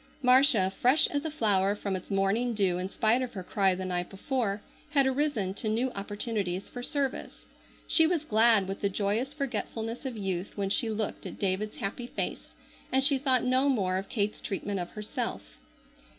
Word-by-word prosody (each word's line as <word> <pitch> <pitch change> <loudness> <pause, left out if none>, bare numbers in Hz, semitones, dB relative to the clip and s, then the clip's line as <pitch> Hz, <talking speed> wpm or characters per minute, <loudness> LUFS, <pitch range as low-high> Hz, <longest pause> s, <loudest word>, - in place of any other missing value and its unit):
Marcia, 250 -7 +5
fresh 260 +5 +5
as 290 +1 -2
a - - -1
flower 205 -8 +1
from 200 -2 -3
its 185 - -7
morning 205 +5 +1
dew 190 -4 +1
in 185 +1 -3
spite 225 +5 +2
of 255 - -4
her 190 -4 -6
cry 190 0 +1
the 185 +1 -5
night 180 -1 -2
before, 210 0 -2 0.3
had 275 -2 +4
arisen 265 -8 0
to 215 +2 -3
new 240 +4 0
opportunities 205 -2 -3
for 245 - -8
service. 275 0 -3 0.4
She 325 -1 +5
was 325 -3 -1
glad 220 -4 +4
with 195 +1 -5
the 200 - +1
joyous 210 +7 -1
forgetfulness 235 -4 -4
of 260 -4 -5
youth 190 -1 -4
when 195 -1 -1
she 225 +2 +2
looked 215 -1 -3
at - - -9
David's 200 +2 -1
happy 235 +5 -4
face, - - -5 0.4
and 265 +1 +3
she 275 -1 +4
thought 260 -2 +3
no 255 +2 +3
more 190 -8 +1
of 195 +1 -5
Kate's 210 -2 -2
treatment 200 0 -3
of 175 - -4
herself. - - -5
215 Hz, 185 wpm, -29 LUFS, 195-255 Hz, 0.4 s, Marcia